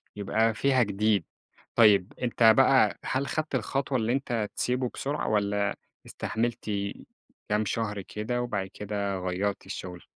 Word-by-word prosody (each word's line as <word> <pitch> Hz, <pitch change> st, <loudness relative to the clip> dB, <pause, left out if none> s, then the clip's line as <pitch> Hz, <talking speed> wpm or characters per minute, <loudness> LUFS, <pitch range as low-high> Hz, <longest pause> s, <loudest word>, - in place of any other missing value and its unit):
يبقى 110 Hz, +3 st, +1 dB
فيها 130 Hz, +3 st, +3 dB
جديد، 105 Hz, -2 st, +1 dB, 0.5 s
طيب 105 Hz, -5 st, +5 dB
أنت 120 Hz, -1 st, 0 dB
بقى، 135 Hz, 0 st, +5 dB
هل 135 Hz, +2 st, -1 dB
خدت 155 Hz, -2 st, -2 dB
الخطوة 135 Hz, +2 st, -1 dB
اللي 115 Hz, 0 st, 0 dB
أنت 120 Hz, -6 st, -1 dB
تسيبه 125 Hz, 0 st, 0 dB
بسرعة، 145 Hz, +2 st, -3 dB
والَّا 100 Hz, -1 st, +1 dB, 0.3 s
استحملت 120 Hz, +1 st, -3 dB, 0.8 s
كام 105 Hz, +1 st, +1 dB
شهر 105 Hz, -1 st, -2 dB
كده 110 Hz, +5 st, -3 dB
وبعد 105 Hz, -6 st, -2 dB
كده 100 Hz, -2 st, -3 dB
غيَّرت 95 Hz, +2 st, -2 dB
الشُغل؟ 90 Hz, -1 st, -7 dB
110 Hz, 130 wpm, -28 LUFS, 100-125 Hz, 0.8 s, طيب